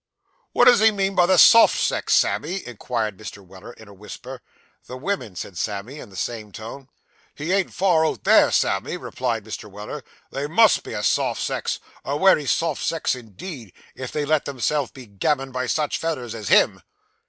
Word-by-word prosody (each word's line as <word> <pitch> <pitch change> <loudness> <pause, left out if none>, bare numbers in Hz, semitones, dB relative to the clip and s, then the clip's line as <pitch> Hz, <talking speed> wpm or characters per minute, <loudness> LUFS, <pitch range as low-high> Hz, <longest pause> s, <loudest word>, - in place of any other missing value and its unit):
'Wot 245 - +5
does 245 -2 +7
he 220 +1 +6
mean 195 -2 -1
by 175 -2 +3
the 185 0 +4
soft 230 +6 +7
sex, - - +1
Sammy?' 190 +2 0
inquired 115 -3 -4
Mr. 100 -2 -10
Weller, 95 +5 -12
in 110 - -16
a 100 - -14
whisper. 125 +6 -10 0.5
'The 125 - -7
womin,' 150 - -4
said 90 -1 -7
Sam, 100 -1 -3
in 140 -5 -10
the 95 - -15
same 110 +1 -5
tone. 120 +7 -9 0.5
'He 155 +4 -4
ain't 195 -1 +1
far 175 -4 +2
out - - -4
there, - - +5
Sammy,' - - 0
replied 115 -3 -3
Mr. 110 -1 -7
Weller; 105 +8 -8 0.3
'they 140 +1 -3
_must 215 +7 +4
_be - - -7
a 105 - -4
soft - - +1
sex - - -2 0.3
a 140 +1 -2
wery 155 -4 +4
soft 165 0 0
sex, 165 -1 0
indeed 120 - -9 0.2
if 130 -1 -7
they 150 -1 -2
let 155 0 +1
themselves 140 +1 -1
be 130 -2 -12
gammoned 130 +6 -2
by 130 0 -2
such 150 -2 -1
fellers 130 -8 -3
as 110 -3 -7
him. - - +4
130 Hz, 190 wpm, -22 LUFS, 110-165 Hz, 0.5 s, does